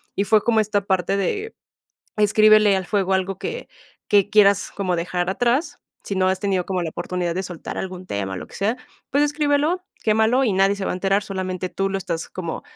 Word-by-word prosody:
Y 200 - 0
fue 215 +1 +4
como 230 -2 +2
esta 210 -1 0
parte 190 -1 0
de 415 - -2 0.6
escríbele 215 0 +5
al 190 -1 -3
fuego 195 -1 0
algo 190 0 -1
que 475 - -5 0.4
que 205 -1 +3
quieras 200 -2 +4
como 185 -3 -1
dejar 175 +1 -2
atrás, 245 - 0 0.3
si 200 - -4
no 185 0 +2
has 190 0 0
tenido 190 -3 0
como 185 -2 -1
la 165 - -3
oportunidad 175 0 -3
de 190 - -2
soltar 175 -3 -7
algún 185 -1 -6
tema, 95 - -3
lo - - -7
que - - -16
sea, 215 +5 0 0.3
pues 285 +2 +2
escríbelo, 295 +4 +1 0.2
quémalo, 220 +4 +3
y 220 - +1
nadie 195 +1 +3
se 200 - -4
va - - -1
a - - -3
enterar, 195 +2 +1
solamente 185 -2 -4
tú 195 0 -1
lo 195 - -1
estás 170 -3 -4
como 170 -3 -5
195 Hz, 205 wpm, -22 LUFS, 185-215 Hz, 0.6 s, escríbele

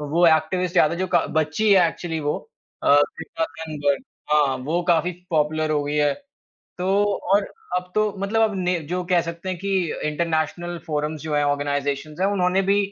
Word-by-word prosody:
वो 155 +4 +2
एक्टिविस्ट 170 +3 +2
याद 155 - +5
है 170 - -3
जो 185 - 0
क 170 - +4
बच्ची 160 +8 +2
है 180 -4 +6
एक्चुअली 165 -1 -4
वो। 145 0 -1 0.5
अ, - - +3
ग्रेटा 145 +2 +1
थनबर्ग 145 -4 -1 0.3
हाँ, 145 -3 +3
वो 155 +7 -1
काफ़ी 175 +1 +3 0.2
पॉपुलर 155 0 +1
हो 150 -1 +1
गई 145 +1 -2
है। 145 -1 +3 0.7
तो 190 +3 +2 0.3
और 205 +1 +4 0.3
अब 180 0 -6
तो 215 -1 +2
मतलब 205 +3 0
अब 220 -2 +2
ने 180 -1 0
जो 180 +1 -1
कह 180 -2 +4
सकते 170 +2 -6
हैं 185 - -3
कि 200 +2 -4 0.4
इंटरनेशनल 170 +2 -1
फ़ोरम्स 150 0 -2
जो 155 -1 -2
हैं, 145 - +2
ऑर्गनाइज़ेशन्स 145 +1 -1
हैं 190 - +3
उन्होंने 190 -1 +2
भी, 195 +1 +2
165 Hz, 185 wpm, -23 LUFS, 150-180 Hz, 0.7 s, है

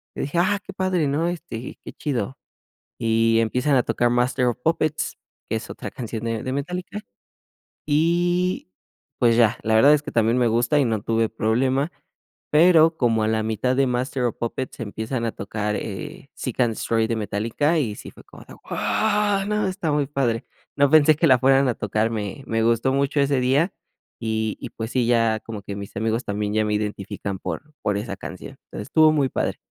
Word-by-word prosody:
yo - - -3
dije: 145 +5 -1
"Ah, 200 +3 +2
qué 195 - -9
padre, 185 -5 0
¿no?, 150 +5 0
este, 155 -9 -7
qué - - -8
chido". 135 -2 -3 0.6
Y 115 0 +2
empiezan 125 +5 +1
a 125 - +3
tocar 120 0 +1
Master 125 +1 +1
of 120 0 0
Puppets, 155 -1 0 0.3
que - - -1
es - - -6
otra - - -6
canción 115 -2 -5
de 115 -1 -2
de 130 - -3
Metallica, 180 +8 -4 0.9
y 175 - +1 0.5
pues 115 -1 +4
ya. 115 -3 +4
La 110 0 +2
verdad 140 +7 +7
es 150 - +2
que - - -6
también 115 +1 +2
me 120 -2 +3
gusta 120 +6 +2
y 135 - +3
no 110 -3 0
tuve 115 +1 +1
problema, 130 +8 0 0.6
pero 165 0 +6
como 115 -3 +2
a - - +1
la 110 -1 0
mitad 110 +4 0
de 135 0 +3
Master 125 +1 -1
of 120 - -1
Puppets 125 +3 -4
empiezan 115 +3 -3
a 115 - -1
tocar, 105 -1 -3
eh, 145 - -6
Seek& 130 - -5
Destroy 115 0 0
de 115 - -1
Metallica, 115 +10 0
y 110 -7 -2
sí - - -10
fue - - -16
como - - -14
de: - - -13 0.2
"¡Wao! 205 -2 +1
¿No? 210 -1 0
Está 185 -5 -2
muy 145 -1 +1
padre". 125 -5 -1 0.3
No 140 0 +4
pensé 155 0 +6
que 160 - +1
la 130 -3 +5
fueran 135 +1 +4
a 120 - 0
tocar, 110 +2 0
me 105 +4 -4
me 115 0 0
gustó 115 +3 +2
mucho 140 +1 +1
ese 140 -1 +2
día 135 +8 +2 0.5
y 110 -1 -2
y - - -5
pues 110 +1 -5
sí, 125 -3 +1
ya 115 -2 +2
como 110 -3 -7
que 100 - -6
mis 100 0 -8
amigos 115 +3 0
también 105 0 -2
ya 110 0 +2
me 105 - -1
identifican 100 -2 -4
por 150 +1 -6
por 105 -1 0
esa 100 -2 -5
canción. 90 - -9
Entonces, 105 - -7
estuvo 155 -1 +5
muy 140 -4 +2
padre. - - -2
125 Hz, 200 wpm, -23 LUFS, 110-150 Hz, 0.9 s, verdad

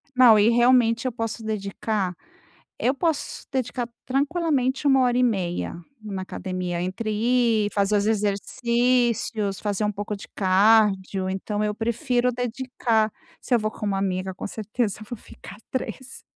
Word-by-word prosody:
Não, 245 -4 +7
e 210 +2 +5
realmente 240 0 +4
eu 255 - -1
posso 225 0 -4
dedicar 200 -2 -2 0.7
eu 260 +3 +2
posso 320 0 -2
dedicar 255 -2 -2 0.2
tranquilamente 275 -1 0
1 270 -1 +5
hora 245 -1 +2
e - - +3
meia 185 -9 -1 0.3
na 200 -3 -5
academia. 185 -2 -4
Entre 190 +5 -3
ir, 230 -1 +2
fazer 200 +1 +2
os 205 - +1
exercícios, 225 0 +1
fazer 205 -1 -2
um 210 - +1
pouco 205 +1 -4
de 200 - -11
cardio, 195 -1 +3
então, 205 +2 -2
eu 210 0 -1
prefiro 240 +3 0
dedicar. 240 -3 -1 0.3
Se - - -8
eu - - +5
vou 215 0 -1
com - - -7
uma 195 -1 0
amiga, 190 -1 -1
com - - -6
certeza, 215 0 -3
eu 215 - -10
vou 240 - -5
ficar 195 - -12 0.2
3. 260 0 -5
220 Hz, 155 wpm, -24 LUFS, 200-245 Hz, 0.7 s, Não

